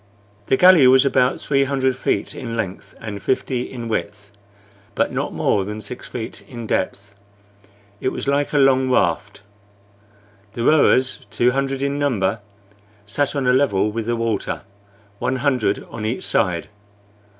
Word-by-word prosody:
This 130 Hz, -, +2 dB
galley 180 Hz, -7 st, +8 dB
was 130 Hz, +1 st, +6 dB
about 130 Hz, -1 st, +2 dB
three 140 Hz, -1 st, +1 dB
hundred 130 Hz, -1 st, 0 dB
feet 130 Hz, -, -1 dB
in 115 Hz, -2 st, -5 dB
length 100 Hz, -4 st, -5 dB
and 105 Hz, -3 st, -6 dB
fifty 130 Hz, 0 st, -1 dB
in 120 Hz, -3 st, -6 dB
width, 105 Hz, -2 st, -4 dB, 0.6 s
but -, -, +1 dB
not -, -, -2 dB
more 100 Hz, -, +1 dB
than 105 Hz, +2 st, -5 dB
six 110 Hz, +4 st, -8 dB
feet 115 Hz, -3 st, -6 dB
in 120 Hz, -3 st, -7 dB
depth. 100 Hz, 0 st, -2 dB, 0.9 s
It 130 Hz, -, 0 dB
was -, -, -5 dB
like 140 Hz, +1 st, +1 dB
a 150 Hz, -, +1 dB
long 130 Hz, -1 st, +4 dB
raft. 100 Hz, -2 st, 0 dB, 1.1 s
The 120 Hz, 0 st, -3 dB
rowers, 130 Hz, -3 st, +3 dB
two 120 Hz, +4 st, +2 dB
hundred 135 Hz, +1 st, -1 dB
in 140 Hz, +1 st, -1 dB
number, 115 Hz, -7 st, 0 dB, 0.7 s
sat 140 Hz, +8 st, -1 dB
on 140 Hz, -2 st, -1 dB
a 125 Hz, -, +4 dB
level 105 Hz, -6 st, +2 dB
with 115 Hz, 0 st, -4 dB
the 120 Hz, -, +1 dB
water, 115 Hz, -4 st, -2 dB, 0.6 s
one 130 Hz, -, 0 dB
hundred 130 Hz, -6 st, 0 dB
on 110 Hz, -, -6 dB
each 110 Hz, +4 st, -2 dB
side. 90 Hz, -5 st, 0 dB
125 Hz, 155 wpm, -21 LUFS, 105-135 Hz, 1.1 s, galley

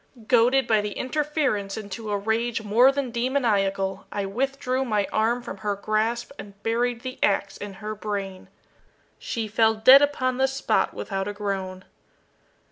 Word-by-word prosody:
Goaded 250 Hz, +2 st, +4 dB
by 220 Hz, -2 st, +3 dB
the 205 Hz, -1 st, -4 dB
interference 265 Hz, -8 st, -1 dB
into 215 Hz, +1 st, -6 dB
a 205 Hz, -, 0 dB
rage 225 Hz, +3 st, -1 dB
more 235 Hz, +6 st, +5 dB
than 275 Hz, -3 st, -3 dB
demoniacal, 205 Hz, -6 st, 0 dB
I 200 Hz, -1 st, -2 dB
withdrew 260 Hz, +4 st, -1 dB
my 210 Hz, -5 st, 0 dB
arm 235 Hz, +3 st, +1 dB
from 200 Hz, -, -7 dB
her 205 Hz, 0 st, -2 dB
grasp 215 Hz, +4 st, -1 dB
and 200 Hz, -1 st, -10 dB
buried 235 Hz, +1 st, 0 dB
the 255 Hz, 0 st, -7 dB
ax 200 Hz, -1 st, +1 dB
in 205 Hz, -1 st, -7 dB
her 210 Hz, +2 st, -6 dB
brain. 200 Hz, -3 st, -5 dB, 0.7 s
She 225 Hz, -3 st, -3 dB
fell 220 Hz, +1 st, +3 dB
dead 255 Hz, +6 st, +8 dB
upon 255 Hz, -3 st, 0 dB
the 265 Hz, 0 st, +3 dB
spot 270 Hz, +1 st, 0 dB
without 195 Hz, -1 st, -3 dB
a 205 Hz, -, -3 dB
groan. 195 Hz, -2 st, -4 dB
220 Hz, 155 wpm, -25 LUFS, 200-255 Hz, 0.7 s, dead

